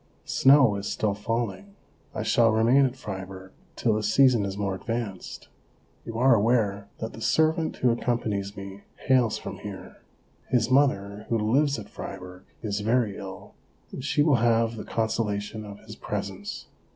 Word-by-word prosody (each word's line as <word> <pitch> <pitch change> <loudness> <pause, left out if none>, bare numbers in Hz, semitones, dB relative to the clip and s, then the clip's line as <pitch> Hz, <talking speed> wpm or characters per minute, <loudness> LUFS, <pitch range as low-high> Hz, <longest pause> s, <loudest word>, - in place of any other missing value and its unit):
Snow 130 -6 +5
is 100 +1 -4
still 105 -2 0
falling; 100 -2 -3 0.4
I - - -2
shall 115 -1 +4
remain 120 +5 +4
at 125 - -7
Fribourg 95 -5 -8 0.2
till 115 - +1
the 110 - 0
season 115 0 +4
is 100 0 -4
more 100 -1 -1
advanced. 110 -1 -5 0.6
You 115 - -5
are 130 +2 +5
aware 105 -3 +1
that 110 - -5
the 115 - -10
servant 160 +5 +2
who 125 - +3
accompanies 105 -4 -2
me 100 0 -8 0.3
hails 125 -4 +3
from - - -7
here. - - -9 0.5
His 125 -1 +1
mother, 105 -7 +1
who 115 - +2
lives 135 +7 +2
at 105 -2 -8
Fribourg, 90 -2 -9 0.2
is 105 -2 -2
very 110 -1 +1
ill, - - -9 0.4
and 130 - -7
she 145 +1 +2
will 145 -4 +4
have 115 0 +2
the 110 - -7
consola 110 -2 -1
tion 105 +1 -7
of 100 0 -10
his 110 0 -11
presence. 100 -1 -5
110 Hz, 165 wpm, -26 LUFS, 100-120 Hz, 0.6 s, Snow